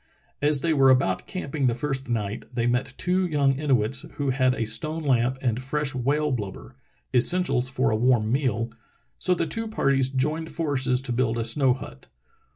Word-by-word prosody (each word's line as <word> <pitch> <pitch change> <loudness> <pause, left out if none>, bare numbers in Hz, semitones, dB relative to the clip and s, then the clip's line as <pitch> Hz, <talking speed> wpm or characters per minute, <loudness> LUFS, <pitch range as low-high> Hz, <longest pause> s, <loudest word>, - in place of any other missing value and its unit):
As 145 -1 +3
they 165 -1 +1
were 135 -3 +5
about 125 -8 +2
camping 145 -7 -2
the 120 - +1
first 135 0 -3
night 110 -2 -3
they 120 -2 -1
met 125 +1 -1
two 185 +1 +1
young 140 -4 +1
Inuits 130 -4 +1
who 140 -2 -1
had 130 -1 +2
a 115 - -2
stone 155 +9 -1
lamp 130 -2 +1
and 120 -1 0
fresh 140 +1 -2
whale 145 +4 0
blubber 105 -7 -5 0.2
— - - -42
essentials 130 -1 +2
for 130 -2 0
a - - +1
warm 115 -1 +2
meal 120 -4 0 0.2
— - - -41
so 180 - +2
the 165 - -1
two 225 +6 -1
parties 135 -10 +1
joined 150 +5 -1
forces 135 -5 0
to 125 - -2
build 120 -1 0
a 115 - -1
snow 125 +2 +2
hut. 65 - -11
130 Hz, 190 wpm, -25 LUFS, 120-150 Hz, 0.2 s, were